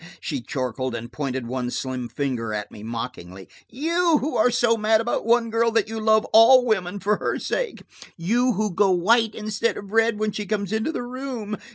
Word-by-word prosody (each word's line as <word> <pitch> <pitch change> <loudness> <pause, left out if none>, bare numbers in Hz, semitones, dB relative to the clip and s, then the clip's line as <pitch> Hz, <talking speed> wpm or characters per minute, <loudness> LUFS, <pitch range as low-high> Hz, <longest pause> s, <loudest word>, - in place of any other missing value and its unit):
she 140 -6 -4
chortled, 130 0 -3
and 120 +1 -7
pointed 130 -2 -3
one 125 +1 -3
slim 125 -1 -4
finger 120 -6 -3
at 105 -1 -5
me 105 - -11
mockingly. 110 -5 -7 0.2
"You, 335 +4 +1
who 290 +3 -3
are 230 - +4
so 240 -1 +2
mad 220 0 +2
about 230 0 -2
one 230 -1 +3
girl 230 +1 +2
that 225 - +2
you 225 0 -4
love 220 0 +3
all 245 +3 +7
women 200 -4 -1
for 210 +2 +1
her - - -2
sake! - - -3 0.3
You, 240 +9 +1
who 210 -1 -1
go 200 +3 +3
white 220 +5 +3
instead 215 +1 -2
of 200 -1 -9
red 225 0 +2
when 215 0 -1
she 205 0 -5
comes 200 -1 -2
into 220 +8 0
the 285 - -4
room! 245 -4 -5
215 Hz, 200 wpm, -23 LUFS, -, 0.3 s, all